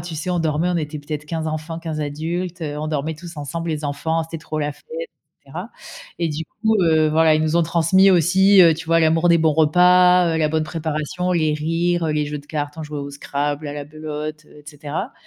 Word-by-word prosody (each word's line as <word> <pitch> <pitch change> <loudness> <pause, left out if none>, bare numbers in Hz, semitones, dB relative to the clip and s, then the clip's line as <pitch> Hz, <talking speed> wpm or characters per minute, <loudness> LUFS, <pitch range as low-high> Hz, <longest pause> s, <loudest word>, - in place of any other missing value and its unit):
tu 170 0 -7
sais, 160 +4 -4
on 175 - 0
dormait, 160 +1 0
on 175 - 0
était 150 -2 -3
peut-être 150 +1 -6
15 160 0 -3
enfants, 155 +1 -4
15 160 -2 -4
adultes, 165 +4 -4
heu, 150 -1 -4
on 155 - -3
dormait 155 +1 -2
tous 170 +1 -11
ensemble, 165 +3 -4
les 155 -1 -3
enfants, 160 +3 -1
c'était 165 0 -7
trop 155 0 -5
la 145 -1 -1
fête - - -23 0.2
et - - -6 0.4
cetera - - -7 0.5
et 170 -1 0
du 150 +1 -3 0.2
coup, 220 0 +2
heu, 160 -2 +3
voilà, 160 0 +4
ils - - 0
nous 155 +2 +1
ont 170 - +4
transmis 170 +4 +4
aussi, 190 +3 +5
heu, 165 -2 +6
tu 165 +1 -9
vois, 165 0 +3
l'amour 160 +2 +3
des 170 - +5
bons 160 -1 +3
repas, 180 +2 +5
heu, - - 0
la 155 -1 +2
bonne 155 0 0
préparation, 160 +2 -3
les 155 -3 +1
rires, 165 +2 0
heu, - - 0
les 150 -1 0
jeux 150 0 -4
de 145 - -15
cartes, 145 -1 -4
on - - -4
jouait 150 -1 -6
au 140 0 -6
scrabble, 145 +1 -3
à - - -5
la 145 -1 -6
belote, 155 0 -6
heu - - -17
et 150 - -17
cetera. 150 - -5
160 Hz, 245 wpm, -21 LUFS, 150-170 Hz, 0.5 s, heu